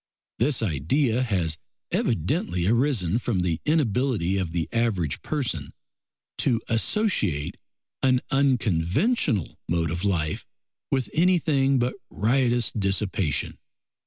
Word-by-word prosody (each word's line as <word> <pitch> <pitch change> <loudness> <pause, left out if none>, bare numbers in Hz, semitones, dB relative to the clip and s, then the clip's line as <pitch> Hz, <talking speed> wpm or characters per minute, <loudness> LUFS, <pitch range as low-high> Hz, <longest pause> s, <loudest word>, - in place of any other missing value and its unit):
This 140 -6 +2
idea 110 - +1
has 90 -10 0 0.3
evidently 85 0 0
arisen 115 - +2
from 115 -6 -1
the 85 -2 -1
inability 125 - +1
of 90 -3 -2
the 80 -2 -2
average 105 -10 0
person 120 - -3 0.7
to 115 - +2
associate 115 - +1 0.4
an 130 -1 +3
unconventional 120 - +1
mode 85 -2 0
of 85 +2 -3
life 85 -6 0 0.5
with 130 -2 0
anything 155 -6 +3
but 125 +1 0 0.2
riotous 120 +1 +2
dissipation. 95 -7 -1
110 Hz, 100 wpm, -25 LUFS, 85-135 Hz, 0.7 s, an